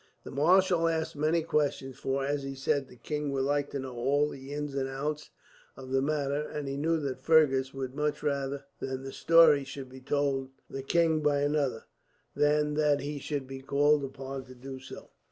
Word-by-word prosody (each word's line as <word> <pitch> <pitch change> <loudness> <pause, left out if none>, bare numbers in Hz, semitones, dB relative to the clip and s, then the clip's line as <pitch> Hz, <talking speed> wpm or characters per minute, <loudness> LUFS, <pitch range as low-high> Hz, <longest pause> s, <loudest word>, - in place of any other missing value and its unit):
The - - -8
marshal 170 +4 +4
asked 160 -1 -1
many 155 +3 +1
questions 140 -4 0
for, 135 0 -1
as 145 0 -1
he 135 0 -5
said, 135 0 0
the 125 - -15
king 150 +4 -3
would 135 -1 0
like 145 +1 0
to - - -4
know 130 -1 -6
all 140 +5 +2
the 135 -1 -8
ins 145 -1 -3
and 135 -1 -1
outs 150 +3 -3 0.5
of 130 -1 -9
the 135 0 +3
matter; 145 0 0
and 150 -1 -5
he 135 - -3
knew 160 +4 +1
that 130 -2 -4
Fergus 135 -4 +4
would 130 -2 -5
much 150 +1 -1
rather 140 -1 -1
that 130 0 -4
the 135 - -6
story 165 -4 +6
should 135 -1 -8
be 130 0 -12
told 135 -1 0 0.2
the 135 - -5
king 160 +3 +2
by 145 -1 +2
another, 145 -5 0 0.5
than 150 0 +2
that 150 -2 +2
he 145 +1 -4
should 140 -1 -3
be 135 0 -8
called 145 +2 +3
upon 135 0 -6
to 130 0 -13
do 130 +1 -8
so. 130 - -11
140 Hz, 200 wpm, -29 LUFS, 135-150 Hz, 0.5 s, story